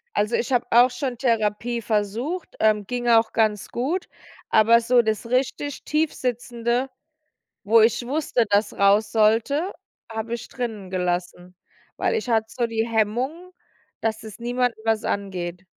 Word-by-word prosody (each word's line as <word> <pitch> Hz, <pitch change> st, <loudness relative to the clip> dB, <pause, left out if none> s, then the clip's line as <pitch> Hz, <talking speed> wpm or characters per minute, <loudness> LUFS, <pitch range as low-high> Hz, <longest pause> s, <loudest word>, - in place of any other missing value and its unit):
Also, 210 Hz, +3 st, +1 dB
ich 245 Hz, -, -2 dB
habe 245 Hz, -1 st, +2 dB
auch 245 Hz, +2 st, +6 dB
schon 250 Hz, -1 st, -4 dB
Therapie 230 Hz, -1 st, 0 dB
versucht, 225 Hz, -, -2 dB
ähm, 215 Hz, -1 st, +2 dB
ging 245 Hz, -1 st, -3 dB
auch 230 Hz, -1 st, +4 dB
ganz 215 Hz, -3 st, +1 dB
gut, 300 Hz, +10 st, -2 dB, 0.4 s
aber 230 Hz, +2 st, +5 dB
so 240 Hz, +1 st, +4 dB
das 220 Hz, 0 st, -2 dB
richtig 265 Hz, +3 st, -1 dB
Tiefsitzende, 245 Hz, -4 st, -1 dB, 0.7 s
wo 220 Hz, +2 st, +5 dB
ich 235 Hz, +2 st, +2 dB
wusste, 275 Hz, -4 st, 0 dB
dass 205 Hz, +1 st, +2 dB
raus 200 Hz, +2 st, +3 dB
sollte, 230 Hz, -, +2 dB, 0.4 s
habe 225 Hz, +1 st, -4 dB
ich 235 Hz, -, -5 dB
drinnen 220 Hz, -7 st, -5 dB
gelassen, 180 Hz, 0 st, -3 dB, 0.4 s
weil -, -, 0 dB
ich 430 Hz, -, -3 dB
hatte 220 Hz, -1 st, +2 dB
so 240 Hz, 0 st, -1 dB
die 225 Hz, 0 st, -1 dB
Hemmungen, 245 Hz, -, -1 dB, 0.5 s
dass 220 Hz, 0 st, -2 dB
es 220 Hz, 0 st, -10 dB
niemanden 245 Hz, 0 st, -1 dB
was 225 Hz, -1 st, +1 dB
angeht, 185 Hz, -2 st, -4 dB
230 Hz, 145 wpm, -23 LUFS, 215-245 Hz, 0.7 s, auch